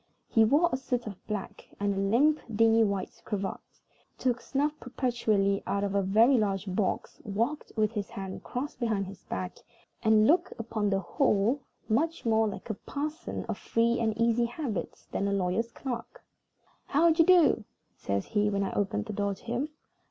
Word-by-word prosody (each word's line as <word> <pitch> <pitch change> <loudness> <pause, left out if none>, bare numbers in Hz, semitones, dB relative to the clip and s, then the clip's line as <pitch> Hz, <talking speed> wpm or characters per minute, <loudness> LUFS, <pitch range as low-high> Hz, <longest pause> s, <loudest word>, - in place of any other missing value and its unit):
He 225 - +4
wore 290 +10 +4
a - - +2
suit 250 -2 -2
of 205 -4 -8
black, 210 -3 -5
and 200 0 +1
a 195 - -2
limp, 250 +11 +3 0.2
dingy 225 +1 +5
white 200 -3 -2
cravat; 200 -2 -3 0.6
took 245 -2 0
snuff 290 +2 0
perpetually 220 -6 0
out 200 0 0
of 200 -1 -1
a 200 - +3
very 225 +7 +5
large 195 -2 0
box; 190 +1 -2
walked 230 +9 -2
with 215 -1 +2
his 205 -3 -4
hands 190 -1 -6
crossed 255 +1 -5
behind 220 -5 0
his 190 0 -11
back; 180 -1 -4 0.4
and 220 -1 +5
looked, 350 +7 +3
upon 220 -2 -1
the 195 -1 +1
whole, 235 - +1 0.3
much 310 +9 0
more 220 -1 +3
like 210 +2 -5
a - - -1
parson 300 - -5
of - - -4
free 235 +1 +1
and 220 -2 0
easy 230 +1 +3
habits 235 - -4
than 200 - -1
a - - 0
lawyer's 200 +4 0
clerk. 245 -3 -6 0.6
"How 330 +4 +4
d'ye 325 +1 +5
do?" 335 -9 +5 0.3
says 100 0 -2
he, 210 -1 +1
when 200 -1 0
I 195 - -3
opened 210 +1 -1
the 215 - -5
door 200 0 -1
to - - -20
him. 240 +6 -2
220 Hz, 180 wpm, -29 LUFS, 200-250 Hz, 0.6 s, dingy